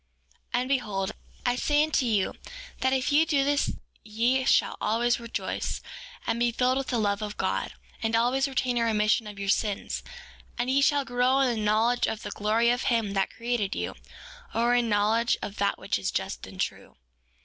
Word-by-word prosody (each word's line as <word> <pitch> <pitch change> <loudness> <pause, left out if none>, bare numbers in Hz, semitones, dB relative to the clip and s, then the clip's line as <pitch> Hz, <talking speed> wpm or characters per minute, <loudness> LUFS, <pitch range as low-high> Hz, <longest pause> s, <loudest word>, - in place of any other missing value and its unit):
4:12 - - +3
And 255 - -3
behold, 210 -8 -1 0.3
I 245 0 +2
say 295 +3 +2
unto 305 -5 +1
you 205 -4 +1 0.5
that 260 - +2
if 265 +1 +1
ye 295 +2 +5
do 295 -4 +2
this 285 0 +1 0.3
ye 235 +5 +1
shall - - +3
always 240 +2 +1
rejoice, 235 -1 -3 0.5
and 235 - 0
be 240 0 +2
filled 255 +2 +1
with 270 - -4
the 245 - 0
love 205 -1 0
of 210 -1 -5
God, - - -1 0.3
and 225 0 0
always 250 +4 +2
retain 255 -2 0
a - - +2
remission 215 0 +2
of 205 -1 -9
your 200 0 -4
sins; 205 0 0 0.6
and 245 +1 0
ye 275 +1 +3
shall 285 -1 +3
grow 250 +2 +2
in 250 -3 +2
the 215 - -2
knowledge 225 +4 +2
of 220 - -4
the - - -5
glory 225 +3 +2
of 245 +1 0
him 225 -5 +1
that 195 -1 +1
created 230 -4 -1
you, - - -3 0.6
or 235 +1 +3
in 245 -1 +3
the - - -2
knowledge 220 +3 +2
of 205 - -6
that 200 0 +1
which - - -2
is - - -2
just - - -3
and - - -12
true. - - -4
235 Hz, 200 wpm, -27 LUFS, 215-255 Hz, 0.6 s, ye